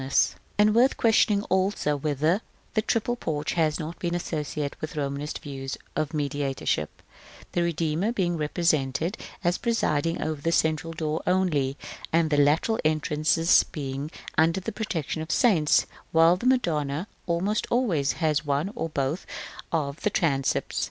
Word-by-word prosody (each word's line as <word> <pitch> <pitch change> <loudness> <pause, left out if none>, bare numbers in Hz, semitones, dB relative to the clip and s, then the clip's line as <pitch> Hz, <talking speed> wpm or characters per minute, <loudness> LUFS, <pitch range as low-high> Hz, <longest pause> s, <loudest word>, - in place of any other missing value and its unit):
FOOTNOTES: 135 +1 +2 0.2
And 210 0 +5
worth 245 +4 +4
questioning, 215 -2 +3
also, 190 -6 +1
whether 155 +6 +1 0.3
the 215 - +2
triple 230 +2 0
porch 150 -10 -2
has 155 -3 +1
not 160 +1 -6
been 175 -1 -1
associated 150 -4 -3
with 155 0 -5
Romanist 145 0 -3
views 135 -2 -6 0.2
of 155 -2 -1
mediatorship; 140 - -2 0.5
the 175 - 0
Redeemer 170 +4 0
being 180 -7 0
represented 155 - 0 0.3
as 175 0 +1
presiding 165 -9 0
over 155 -2 -3
the 165 - 0
central 160 0 +1
door 155 -1 -2
only, 155 -7 +1 0.3
and 165 -1 +2
the 145 - +3
lateral 150 +10 +3
entrances 155 +2 +3
being 140 -1 -4 0.3
under 165 +3 +4
the 185 - -4
protection 165 - -3
of 160 - -6
saints, 175 - +4 0.3
while 165 +2 +6
the 210 +7 -2
Madonna 160 - +1 0.2
almost 185 +5 0
always 185 - +1
has 155 -3 0
one 145 +6 0
or 200 -9 -3
both 145 +3 -2 0.4
of 150 -2 -2
the - - +2
transepts. 140 -8 0
160 Hz, 145 wpm, -26 LUFS, 145-180 Hz, 0.5 s, while